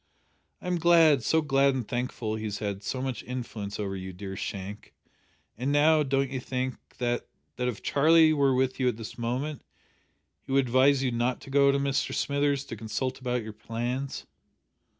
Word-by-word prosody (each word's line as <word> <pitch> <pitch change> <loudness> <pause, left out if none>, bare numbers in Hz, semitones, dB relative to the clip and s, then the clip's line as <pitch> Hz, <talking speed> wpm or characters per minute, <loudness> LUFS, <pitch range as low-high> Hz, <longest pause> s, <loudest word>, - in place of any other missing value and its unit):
"I - - -10
am 180 -1 0
glad 165 -4 +6
so 160 +7 +2
glad 140 -2 +3
and 125 -5 -3
thankful 120 -3 -3
he 110 0 -5
has 105 -1 -3
had 100 -2 -3
so 130 +5 -3
much 130 -2 -3
influence 115 -5 -5
over 100 -2 -2
you, 95 0 -6
dear 95 +1 -7
Shank, 100 0 -6 0.6
and 130 +5 -2
now, 155 +2 +5
don't 135 -1 0
you 130 - -2
think 130 0 -3 0.2
that 120 -1 -1 0.3
that 125 - -1
if 120 -4 -4
Charlie 160 +2 +5
were 140 -3 +3
with 130 +1 0
you 130 - +2
at 120 -3 0
this 115 +1 -8
moment 130 +5 -2 0.8
he - - -10
would 135 0 +3
advise 130 +3 +4
you 130 - +1
not 120 +2 0
to 135 - -11
go 140 0 +5
to 140 - +1
Mr 140 -1 0
Smithers 140 -1 +1
to 115 - -6
consult 115 +4 -3
about 125 -2 -1
your 110 0 -7
plans?" 120 +5 -4
130 Hz, 190 wpm, -28 LUFS, 115-140 Hz, 0.8 s, glad